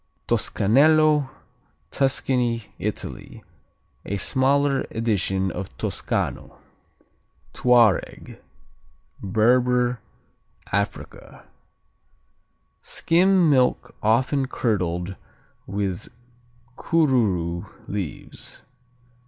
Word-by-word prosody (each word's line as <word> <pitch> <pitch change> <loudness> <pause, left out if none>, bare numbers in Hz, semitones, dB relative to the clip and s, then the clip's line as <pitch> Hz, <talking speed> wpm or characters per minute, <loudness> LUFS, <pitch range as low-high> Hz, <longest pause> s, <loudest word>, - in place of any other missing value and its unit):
Toscanello 150 +5 +3 0.6
Tuscany, 125 -4 0
Italy - - -5 0.6
A 100 - -3
smaller 135 +5 +2
edition 95 -4 -1
of 95 +3 -7
Toscano. - - -3 1.0
Touareg 120 -6 +2 0.8
Berber, 125 +4 +2 0.7
Africa 100 0 -4 1.4
Skim 180 +1 +2
milk 130 -4 +2
often 130 +5 +1
curdled 90 -7 -2 0.5
with 100 0 -3 0.7
Korourou 105 - 0 0.2
leaves. 95 -6 -6
120 Hz, 55 wpm, -23 LUFS, 100-135 Hz, 1.4 s, Toscanello